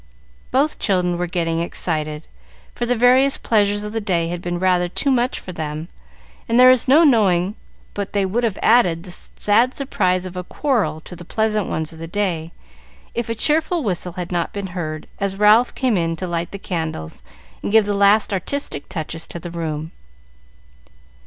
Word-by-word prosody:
Both 285 +4 +1
children 180 -3 +1
were 180 - -1
getting 165 -1 -1
excited, 155 -3 -3 0.5
for 240 - -3
the 245 - +2
various 255 +3 +4
pleasures 205 -2 +1
of 210 0 -6
the 225 - -2
day 170 -5 0
had 175 0 -4
been 175 0 -3
rather 180 -1 +2
too 275 +9 0
much 250 0 +1
for 185 - -8
them, 155 0 -5 0.6
and 230 +2 +3
there 255 0 +9
is 255 -1 +3
no 295 +6 +6
knowing 200 - +3 0.4
but 200 -1 -4
they 200 -1 +1
would 225 +6 -1
have 220 -5 0
added 180 -8 +4
the 185 - -10
sad 220 +7 +1
surprise 185 -9 0
of 185 0 -8
a 180 - -4
quarrel 230 - -1
to 180 - -9
the 175 - -10
pleasant 215 +2 0
ones 160 +1 -3
of 160 - -13
the 165 - -6
day, 170 -4 -2 0.6
if 235 -1 -3
a 230 - -1
cheerful 315 +6 +2
whistle 180 -4 -2
had 180 0 -5
not 175 -1 -1
been 200 -1 -4
heard, 155 -4 -4
as 195 -1 -2
Ralph 210 +4 +5
came 255 -4 +1
in 165 -2 0
to 185 - -4
light 170 0 -2
the 200 - -6
candles 160 - -5 0.4
and - - -3
give 220 -1 +5
the 205 - -1
last 200 +1 +3
artistic 195 - -3
touches 165 -1 -5
to 170 - -6
the 170 +1 -8
room. 160 -2 -4
190 Hz, 190 wpm, -20 LUFS, 170-225 Hz, 0.6 s, there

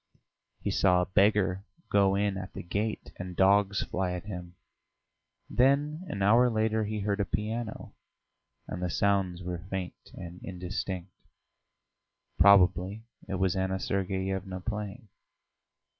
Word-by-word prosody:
He - - 0
saw 90 -2 +4
a - - 0
beggar 95 0 +2 0.3
go 100 -1 +4
in 100 0 +1
at 95 0 -6
the - - -6
gate 105 +5 -3
and 90 -1 -6
dogs 100 +1 +4
fly 90 -1 -2
at 90 +1 -5
him; 90 -3 -7 0.9
then 145 +6 +2
an 100 - -3
hour 120 +5 +5
later 110 -1 +1
he 105 0 -3
heard 100 0 -1
a - - +3
piano, 110 +3 -4 0.7
and - - -5
the 90 - -1
sounds 95 -1 +1
were 90 -1 -4
faint 95 -2 -5
and 85 0 -9
indistinct. 90 0 -5 1.3
Probably 95 +2 +5 0.2
it 95 - -2
was 95 -1 +1
Anna 95 0 -1
Sergeyevna 95 0 -2
playing. 105 +2 -5
95 Hz, 130 wpm, -29 LUFS, 90-105 Hz, 1.3 s, hour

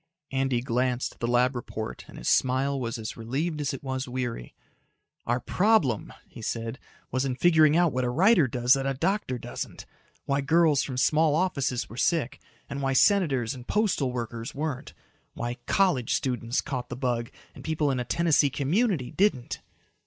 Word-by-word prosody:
Andy 135 -2 0
glanced 125 0 -1
at - - -27
the 120 - -1
lab 125 +2 +2
report 110 -2 -6
and - - -12
his - - -6
smile 135 +2 +2
was 120 0 -3
as 110 -1 -6
relieved 145 +8 -2
as 140 - -1
it 135 - -7
was 130 -1 -3
weary. 125 - -4 0.7
"Our 120 +1 +1
problem," 180 - +2 0.2
he - - -12
said, 115 +3 -4 0.3
"was 130 0 0
in 130 -2 -1
figuring 155 +1 +5
out 175 -3 +3
what 130 0 0
a 125 - 0
writer 170 - +4
does 125 +1 +3
that 135 -1 0
a 135 - -1
doctor 170 -3 -1
doesn't - - -7 0.4
why 140 0 +1
girls 160 0 +3
from 130 -3 -4
small 155 +3 +3
offices 140 -8 0
were 115 - -11
sick 155 -3 0 0.3
and 140 - -5
why 135 -1 0
senators 135 - +3
and 125 -2 -11
postal 190 - +1
workers 120 +1 -5
weren't 145 -3 -4 0.4
why 120 +1 -4
college 180 - +2
students 120 -1 -1
caught 125 -4 -5
the 125 - -4
bug 120 -3 -1 0.2
and - - -12
people 155 -2 0
in 130 - -1
a - - -1
Tennessee 150 +3 +2
community 150 - 0
didn't. 180 -12 0
135 Hz, 175 wpm, -27 LUFS, 125-155 Hz, 0.7 s, figuring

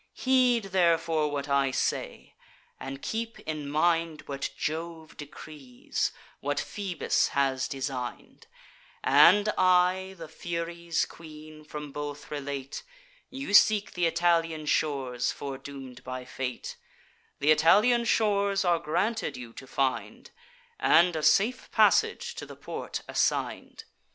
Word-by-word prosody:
Heed 255 -3 +3
therefore 165 -4 +2
what 145 -1 -3
I 140 -1 +2
say; 130 - -3 0.5
and 135 +1 -7
keep 230 +1 -4
in 150 -2 -5
mind 165 +1 +1
What 140 -1 -4
Jove 160 0 -4
decrees, 145 -3 -5 0.3
what 145 +1 -1
Phoebus 195 -4 -1
has 135 -1 +1
design'd, 130 -3 -6 0.6
And 180 +10 +6
I, 185 +1 +3
the 165 -1 -8
Furies' 170 +1 -3
queen, 155 -1 -12
from 150 -1 -8
both 145 0 -6
relate: 140 -2 -5 0.5
You 270 -5 -6
seek 210 0 +5
th' - - -10
Italian 165 -2 +1
shores, 135 -5 0
foredoom'd 135 -2 -8
by 130 0 -6
fate: 125 -1 -5 0.6
Th' - - -3
Italian 210 +10 +4
shores 200 -3 +2
are 175 -1 +3
granted 200 - -1
you 120 -2 -9
to 135 - -11
find, 130 0 -2 0.5
And 175 - +4
a 155 - -1
safe 195 +11 +2
passage 480 0 +3
to - - -6
the - - -10
port - - -6
assign'd. - - -1
155 Hz, 120 wpm, -28 LUFS, 140-180 Hz, 0.6 s, And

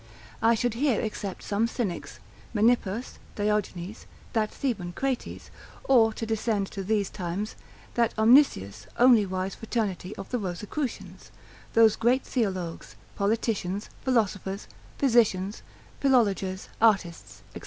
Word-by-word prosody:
I 230 +1 +5
should 245 +1 0
here 255 -1 +1
except 205 -3 -4
some 210 +3 +1
Cynics, 225 -7 -4 0.4
Menippus, 225 0 +1 0.2
Diogenes, 205 -2 -2 0.3
that 215 -2 +1
Theban 195 -10 -3
Crates; 265 +4 -3 0.3
or 230 -4 +5
to 225 - -4
descend 220 -2 0
to 195 - -5
these 205 0 +1
times, 190 +3 -4 0.4
that 235 -1 +2
omniscious, 215 - +4
only 240 -5 +6
wise 185 +1 -3
fraternity 210 -4 -3
of - - -7
the 250 - 0
Rosicrucians, 210 - -5 0.4
those 225 -2 +6
great 245 +3 +2
theologues, 185 -9 -3 0.2
politicians, 205 -2 -1
philosophers, 205 -6 0 0.3
physicians, 220 -6 +2 0.4
philologers, 200 -8 +2
artists, 195 -7 +1
&c. - - -7
215 Hz, 115 wpm, -27 LUFS, 190-235 Hz, 0.4 s, only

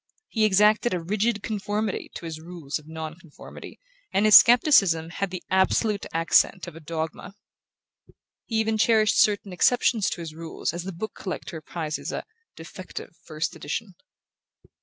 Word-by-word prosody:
He 220 -2 +1
exacted 210 +1 +3
a - - -2
rigid 210 +5 -1
conformity 210 -1 -3
to - - -7
his 160 -1 -6
rules 165 -4 -6
of 150 - -19
non 160 -1 -6
conformity 165 -4 -12 0.3
and 195 +2 +2
his 215 - +7
scepticism 195 - +6
had 200 +2 -3
the 180 -1 -7
absolute 200 +2 +1
accent 165 +3 +2
of - - -10
a - - -9
dogma. 165 +4 -6 1.1
He 225 - -4
even 220 0 0
cherished 215 -1 +3
certain 205 -2 +1
exceptions 225 +1 +2
to - - -5
his 160 -2 -7
rules 165 +1 -4
as 170 +1 -5
the 190 - -4
book 195 +4 -6
collector 170 -3 -6
prizes 155 -1 -5
a - - -4 0.3
"defective" 170 +1 -9
first 155 +1 -3
edition. 190 +7 -5
185 Hz, 155 wpm, -25 LUFS, 165-215 Hz, 1.1 s, his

